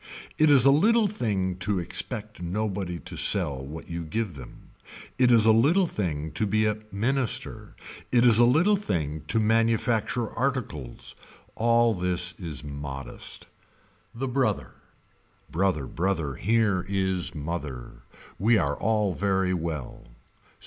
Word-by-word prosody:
It 155 0 +5
is 135 -3 +6
a 135 - +7
little 215 +10 +4
thing 100 - -2
to 100 +2 -1
expect 105 +4 -5
nobody 95 -1 -3
to - - -7
sell 65 -2 +1
what 75 +4 -8
you 85 0 -4
give 100 +5 -3
them. 65 -4 -13 0.5
It 125 -1 +5
is 115 -2 +5
a 110 - +7
little 150 - +4
thing 80 - -3
to 95 +8 -1
be 110 +2 +2
a 105 0 0
minister. 120 +4 -1 0.4
It 120 -1 +4
is 115 -2 +6
a - - +7
little 160 +12 +4
thing 80 - -3
to 115 - +2
manufacture 115 +1 +1
articles. 115 - -4 0.4
All 115 0 +3
this 90 -1 0
is 80 -7 -6
modest. 70 -2 -7 0.7
The 135 +3 -3
Brother. 125 -5 -1 0.8
Brother 90 -5 0
brother 80 -1 -2
here 105 - +1
is 95 -3 -1
mother. 75 -5 -6 0.4
We 110 +4 +4
are 70 -6 0
all 105 -4 0
very 95 -1 0
well. 80 -6 -5
100 Hz, 135 wpm, -26 LUFS, 85-115 Hz, 0.8 s, a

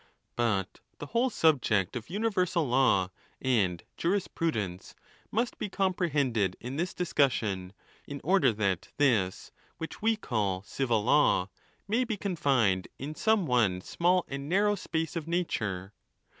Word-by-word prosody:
But 105 -6 0 0.2
the - - -6
whole 235 - +1
subject 125 - +2
of 120 +2 -6
universal 185 -5 0
law 120 -8 +3 0.3
at 100 -10 +1 0.2
jurispr 170 -2 0
udence 95 - -5 0.3
must 235 +3 -1
be - - -3
comprehended 145 - 0
in' 125 +3 -6
this 175 +3 -2
discussion, 110 - 0 0.4
in 140 0 -6
order 170 -7 +4
that 100 -4 -1
this 110 -10 +1 0.3
which 165 - -7
we 225 +1 +3
call 100 - -2
civil 115 -1 0
law, 115 -7 +3 0.4
may 225 +5 +2
be 225 -4 -3
confined 135 - +1
in 145 +3 -5
some 220 +2 +2
one 115 -9 +2
small 180 - +1
and 140 +1 -5
narrow 205 +3 +3
space 165 -4 -3
of 165 -2 -4
nature. 105 - -2
140 Hz, 135 wpm, -29 LUFS, -, 0.4 s, order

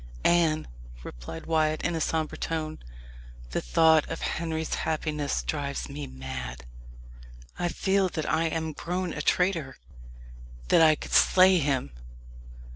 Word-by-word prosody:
"Anne," 165 -3 +3 0.4
replied - - -8
Wyat 155 -1 +1
in 175 - 0
a 165 - -2
sombre 160 0 -1
tone, 155 -1 -3 0.7
"the - - -1
thought 160 - +4
of - - -5
Henry's 160 -1 -2
happiness 150 -2 -2
drives 140 -2 -3
me 140 0 -6
mad. 65 -2 -7 0.9
I 175 - +1
feel 190 +2 +1
that 155 -3 -4
I 160 +1 +1
am 160 -1 -2
grown 180 +2 -3
a 150 - -4
traitor 170 -5 0 0.9
that - - +6
I 155 -1 +6
could - - -8
slay 185 0 +6
him." 135 - -1
155 Hz, 130 wpm, -27 LUFS, 145-165 Hz, 0.9 s, that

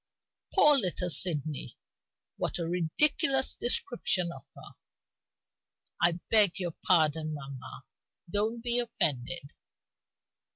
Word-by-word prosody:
Poor 295 -7 +5
little 180 -3 0
Sydney, 150 - +1 0.6
what - - -3
a 170 -2 -4
ridiculous 265 - +1
description 195 -7 0
of 135 - -11
her! - - -13 1.3
I 170 0 +3 0.2
beg 210 -5 +5
your 175 -4 -4
pardon, 155 -2 +1
mamma; 135 -2 -10 0.4
don't 215 +5 -2
be 240 0 +3
offended." 145 - -2
175 Hz, 95 wpm, -28 LUFS, 155-230 Hz, 1.3 s, Poor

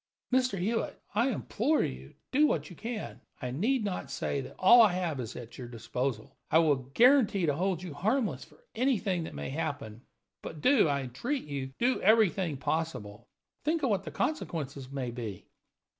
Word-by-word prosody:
"Mr. 255 -5 +2
Hewitt, 220 +6 -1
I 235 +5 +2
implore 260 +5 +1
you, 65 +2 -6 0.2
do 295 +3 +5
what 150 - -1
you - - -10
can. 225 +4 -6 0.2
I 125 -3 -4
need 220 - +1
not 190 -3 -3
say 140 - -2
that - - -10
all 235 +6 +8
I 210 -5 +5
have 175 -6 -2
is 120 -2 -5
at 120 +1 -9
your 125 - -6
disposal. 120 0 -4
I - - +5
will 160 -3 +5 0.2
guarantee 240 -7 +5
to 150 - +2
hold 180 +2 -1
you 175 -5 -6
harmless 220 - 0
for - - -20
anything 220 -8 0
that - - -8
may 70 - -4
happen. 140 -7 -4 0.4
But 155 - -7
do, 255 - +5
I 140 -1 0
entreat 235 - -3
you, 135 -2 -5
do 250 +2 +1
everything 195 -7 +3
possible. 125 -9 -3 0.4
Think 315 +1 0
of 260 - +2
what 195 -1 +1
the - - -6
consequences 140 - -3
may 135 -3 -3
be!" 115 -6 -6
170 Hz, 180 wpm, -30 LUFS, -, 0.4 s, all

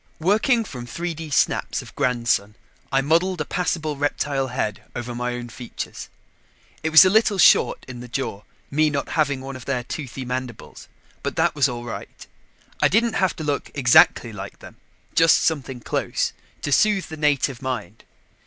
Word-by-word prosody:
Working 220 +7 +2
from 125 -8 -8
3D 165 +3 -5
snaps - - +1
of - - -14
Grandson, 115 -6 0 0.4
I 135 0 +3
modeled 170 +6 +1
a - - -1
passable 160 -4 -2
reptile 145 -1 -1
head 125 -4 -3
over 120 0 -4
my 125 0 -3
own 120 -1 -6
features. 120 +1 -7 0.7
It 160 - -1
was 160 +4 +9
a - - +5
little 215 -1 +3
short 180 - +5
in 125 -2 -8
the 125 - -8
jaw, 120 -5 -4 0.3
me 155 +2 +3
not 140 -2 -3
having 140 -4 0
one 135 0 -7
of 130 - -10
their 130 -3 -1
toothy 135 0 -6
mandibles, 125 -2 -6 0.3
but - - -3
that - - +2
was 140 -2 +2
all 120 -1 -5
right. 120 - -8 0.6
I - - +6
didn't 230 +2 +2
have 190 -4 +1
to 160 - -6
look 145 -2 -2
exactly 125 -3 +5
like 100 -1 -8
them, - - -14 0.4
just 165 0 +6
something 135 -5 -1
close, - - -1 0.3
to 145 - -2
soothe 205 +5 +3
the 160 - -6
native 145 -4 +1
mind. 125 -5 -5
135 Hz, 170 wpm, -23 LUFS, 125-160 Hz, 0.7 s, was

